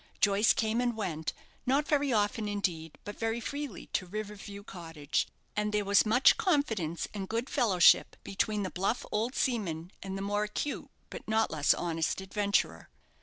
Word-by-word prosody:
Joyce 205 +1 +4
came 225 +2 0
and 240 -2 0
went, 160 -7 -2 0.4
not 280 +3 +2
very 285 -2 +2
often 210 0 +1
indeed, 175 -6 -2
but 205 - -8
very 225 +1 0
freely 285 +3 -5
to 185 - -1
River 210 +2 -5
View 200 0 -9
Cottage, 165 -7 -3 0.3
and 210 0 0
there 210 -1 0
was 200 +2 +4
much 245 - +5
confidence 235 - 0
and 195 -2 -5
good 230 +4 -2
fellowship 210 - +5
between 205 +1 -1
the 185 - -3
bluff 195 +7 -1
old 225 +5 -1
seaman 185 - -1
and 195 0 -5
the 195 - -4
more 205 +1 0
acute, 245 +7 -4 0.2
but - - -8
not 220 0 +2
less 150 -2 +3
honest, 165 -1 -1
adventurer. 200 +1 0
205 Hz, 170 wpm, -30 LUFS, 190-230 Hz, 0.4 s, much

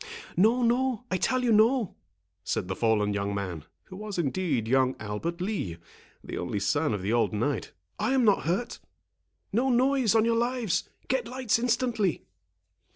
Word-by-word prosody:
"No, 225 +7 +4
no—I 245 -4 +1
tell 255 +7 +1
you 240 - +2
no," 225 0 +3 0.5
said 90 - -2
the 95 - -3
fallen 105 -2 +1
young 100 0 -2
man, 90 -6 -4 0.2
who 185 - -12
was 210 0 -6
indeed 150 -7 0
young 130 +1 +3
Albert 110 +12 -4
Lee, 185 - -2 0.5
the - - -5
only 95 +4 -2
son 145 +5 +1
of 95 - -5
the 105 +4 0
old 120 -1 +2
knight; 120 +7 -1 0.3
"I 260 - +1
am 260 -3 +3
not 205 -7 +3
hurt. 185 +9 -1 0.7
No 250 +5 +2
noise, 255 -2 +3
on 225 0 +4
your 230 0 +2
lives; 240 -4 0 0.2
get 255 -3 0
lights 250 -2 0
instantly." 230 - 0
195 Hz, 160 wpm, -28 LUFS, -, 0.7 s, No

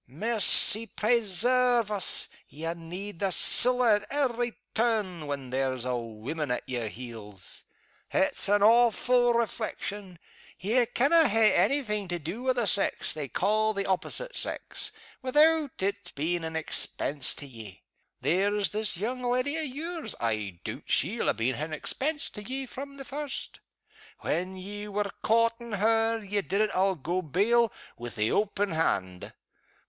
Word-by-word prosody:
Mercy 220 - +4
presairve 235 +2 +2
us! 200 -3 +2 0.2
ye 160 +3 -7
need 170 +3 -8
the 195 -1 0
siller 245 +1 +6
at 210 - -10
every 245 -4 -1 0.2
turn, 210 -9 -1
when 140 -3 -5
there's 130 -1 -1
a 125 -1 -1
woman 120 +6 -5
at 125 - -3
yer 120 -3 -3
heels. 110 -5 -9 0.4
It's - - +1
an 205 0 +3
awfu' 240 +2 +4
reflection 210 -4 -3 0.4
ye 230 +5 +1
canna 295 +7 +4
hae 220 -1 +4
any 280 +1 +2
thing 210 -4 -2
to 175 -1 -2
do 170 +9 -6
wi' 260 0 +1
the 240 -2 0
sex 200 0 +1
they 150 -3 -5
ca' 215 - +1
the 200 -1 -2
opposite - - -2
sex - - -2 0.3
without 300 +3 +4
its 200 +1 -2
being 165 +4 -2
an 160 0 -5
expense 145 -3 0
to 145 - -9
ye. 110 -7 -11 0.4
There's 200 +3 +1
this 210 -3 -2
young 245 +7 -3
leddy 250 +4 0
o' 320 - -1
yours, 315 +4 -4
I 105 -6 -2
doot - - -6
she'll - - +1
ha' - - -8
been 120 +3 0
an 155 +3 -5
expense 285 - -2
to 210 - -8
ye 265 +5 -4
from 275 +2 -9
the 275 - -8
first. 290 0 -5 0.6
When 185 +2 -2
you 205 +2 -8
were 205 -1 -1
coortin' 230 +1 +1
her, 225 +2 +2
ye 205 -1 -2
did 195 +1 -1
it, 215 - +1
I'll 190 +1 +2
go 175 +4 -2
bail, 210 - +2 0.3
wi' 120 0 -6
the 110 -2 -1
open 205 -1 0
hand. 95 - -1
205 Hz, 155 wpm, -28 LUFS, 160-240 Hz, 0.6 s, siller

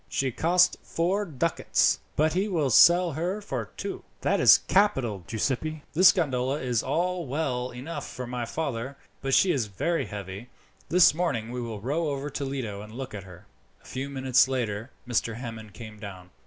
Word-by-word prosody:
She 135 -1 0
cost 180 +7 +3
four 190 +5 -1
ducats, 165 0 +1 0.2
but 155 +1 +2
he 190 +4 +1
will 160 -9 0
sell 175 +7 +6
her 175 +7 -2
for 205 - -4
two." - - -5 0.2
"That - - +1
is - - +8
capital, 135 - +2
Giuseppi. 140 - -2
This 180 +3 +7
gondola 135 -5 -1
is 125 -3 0
all 175 +3 -1
well 130 -3 -2
enough 140 +5 -6
for 125 - -6
my 120 0 -4
father, 135 -1 -4 0.2
but 135 0 +1
she 190 - +4
is 125 -8 0
very 165 - -1
heavy. 100 +3 -7 0.4
This 180 -2 +6
evening 140 -10 -2
we 125 0 -4
will 115 -4 -6
row 150 +8 -1
over 140 +1 -4
to 140 - -4
Lido 125 -7 -4
and 105 +1 -10
look 130 +2 -7
at 100 -3 -7
her." 90 +1 -13 0.4
A - - -24
few 130 +2 -5
minutes 130 -1 +3
later 115 -3 -2 0.2
Mr. 115 -2 0
Hammond 115 -3 -8
came 110 -3 -10
down. 95 -3 -9
135 Hz, 180 wpm, -27 LUFS, 115-165 Hz, 0.4 s, is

